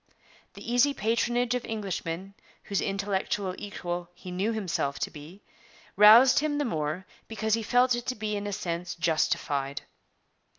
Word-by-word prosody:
The - - -10
easy 280 +3 +4
patronage 240 +3 +1
of 250 -1 -1
Englishmen, 195 -3 -4 0.3
whose 200 -2 -1
intellectual 195 -1 -1
equal 175 -4 -5
he 180 - -9
knew 190 +5 0
himself 180 -10 -2
to - - -3
be, 160 +6 -12 0.5
roused 220 +6 +8
him 295 0 -1
the 290 - 0
more 160 - -2 0.2
because 220 -1 -2
he 225 - +2
felt 245 +3 +3
it 240 0 -3
to 255 - -1
be 215 -1 -3
in 205 0 -3
a - - -3
sense 170 -1 -4
justified. 145 -4 0
200 Hz, 155 wpm, -28 LUFS, 175-230 Hz, 0.5 s, roused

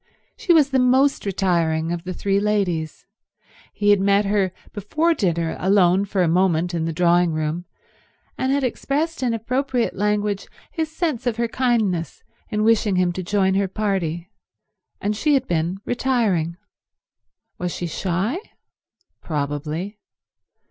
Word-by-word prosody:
She 360 - 0
was 300 -4 +5
the 265 - +3
most 260 -1 +3
retiring 170 -4 0
of 175 0 -4
the 185 - -4
three 195 +2 +1
ladies. 190 -7 -1 0.7
He 205 0 +2
had 205 - +5
met 200 +1 +3
her 195 -2 +1 0.2
before 310 - +1
dinner 170 - -1
alone 190 0 +3
for 195 -2 0
a - - +2
moment 175 0 +2
in 165 -2 -1
the 165 - -1
drawing 175 0 +3
room, 155 +3 -2 0.7
and 260 - -1
had 280 0 +1
expressed 290 +6 -1
in 250 -2 +1
appropriate 250 +2 -1
language 205 0 -1 0.2
his 320 -2 -3
sense 310 -7 -2
of 235 -2 0
her 235 0 0
kindness 225 -9 0 0.3
in 210 -2 0
wishing 220 -3 +3
him 180 -1 +2
to 185 - -4
join 190 +1 +1
her 195 0 +1
party, 190 -3 -2 0.7
and 210 +1 -1
she 290 +7 +2
had 265 -1 0
been 170 +2 -1
retiring. 220 -10 0 1.0
Was 180 0 -2
she 175 - -4
shy? 190 - -1 0.8
Probably. 150 +6 -3
200 Hz, 145 wpm, -22 LUFS, 175-235 Hz, 1.0 s, was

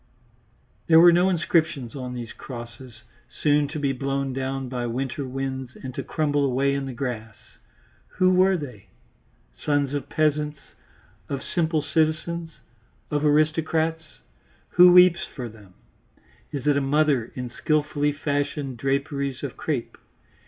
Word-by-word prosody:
There 160 -1 +7
was 175 +1 +8
no 180 +2 +4
inscription 160 -7 0
on 125 -2 -6
these 120 -2 -6
crosses, 120 -1 -10 0.3
soon 145 -1 +1
to 150 +3 -6
be 140 -2 0
blown 135 0 -2
down 135 0 -3
by 125 -1 -3
winter 130 +3 -3
winds 130 -1 -4
and 130 -1 -6
to - - -4
crumble 145 -2 0
away 140 +1 +1
in 140 -1 -2
the - - -4
grass. 120 -4 -5 0.8
Who 185 0 +4
were 185 +1 +4
they? 125 - -9 0.7
Sons 145 -2 0
of 145 - -3
peasants, 150 -1 0 0.7
of 140 -1 -3
simple 160 -3 0
citizens, 160 +2 0 0.6
of 145 0 0
aristocrats? 160 +1 +1 0.5
Who 180 0 +7
weeps 180 -1 +6
for 125 -4 -6
them? 105 -4 -15 0.8
Is 140 -1 -5
it 145 -1 +3
a - - +1
mother 140 -3 +1
in 125 -2 -5
skilfully 150 +1 0
fashioned 145 -2 -2
draperies 140 +1 -2
of - - -4
crape? - - -4
140 Hz, 140 wpm, -24 LUFS, 130-155 Hz, 0.8 s, was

